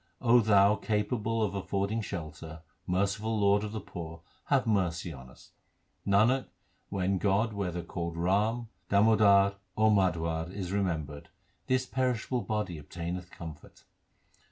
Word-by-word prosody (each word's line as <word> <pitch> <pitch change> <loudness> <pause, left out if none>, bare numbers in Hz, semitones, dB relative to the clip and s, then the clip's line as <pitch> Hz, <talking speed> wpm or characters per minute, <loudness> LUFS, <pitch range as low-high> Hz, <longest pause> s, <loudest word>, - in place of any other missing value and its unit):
O 120 0 +5
Thou, 100 -2 +5
capable 110 +2 -1
of 100 -3 -1
affording 100 +3 -1
shelter, 80 -4 -7 0.2
merciful 100 +4 0
Lord 100 0 +3
of 105 - -4
the 110 - -4
poor, 85 -4 -8 0.2
have 135 -3 +2
mercy 90 -6 0
on 65 -2 -11
us. 65 - -18 0.6
Nanak, 110 +7 +3 0.4
when 95 -1 0
God 105 +3 +1
whether 90 -4 -3
called 85 0 -5
Ram, 105 +7 +1 0.2
Damodar, 100 -1 +5 0.2
or 110 0 +4
Madhwa 85 -4 +1
is 95 -2 -5
remembered, 80 -8 -2 0.4
this 130 0 +1
perishable 125 -1 -1
body 105 -8 -3
obtaineth 85 +3 -6
comfort. 80 -4 -11
100 Hz, 130 wpm, -30 LUFS, 85-110 Hz, 0.6 s, O